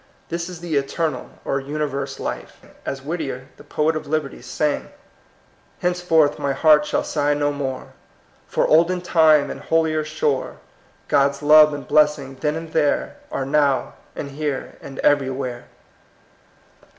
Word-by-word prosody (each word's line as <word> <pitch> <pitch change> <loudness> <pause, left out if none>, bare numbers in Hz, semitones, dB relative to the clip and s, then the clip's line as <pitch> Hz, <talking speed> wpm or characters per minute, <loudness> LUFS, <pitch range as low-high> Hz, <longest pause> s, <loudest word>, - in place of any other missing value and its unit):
This 170 +1 -3
is 175 -2 -9
the 165 -4 -1
eternal, 150 +3 -2 0.2
or 135 - 0
universe 140 0 -3
life. - - -5 0.3
As 135 -1 -4
Whittier, 140 -4 -4
the - - -14
poet 155 +1 0
of 155 - -5
liberty, 150 -4 -2
sang: 145 +4 -2 0.3
— - - -34
'* - - -35
Henceforth 175 -4 +2
my 140 -1 0
heart 150 0 +5
shall - - 0
sigh 145 -1 0
no 145 0 +1
more 135 -2 -5 0.5
For - - +1
olden 170 +3 +3
time 160 -4 +4
and - - -7
holier 160 -1 +1
shore; 150 -3 -2 0.5
Grod's 140 0 +2
love 150 +1 +7
and 145 -3 -6
blessing 150 -3 +2
then 150 0 0
and 160 0 -7
there 150 -3 +1
Are 135 - -2
now 140 -2 +1 0.2
and 140 - -6
here 145 -1 -4
and 135 -1 -10
everywhere.' 130 -3 0
150 Hz, 150 wpm, -22 LUFS, 140-155 Hz, 0.5 s, love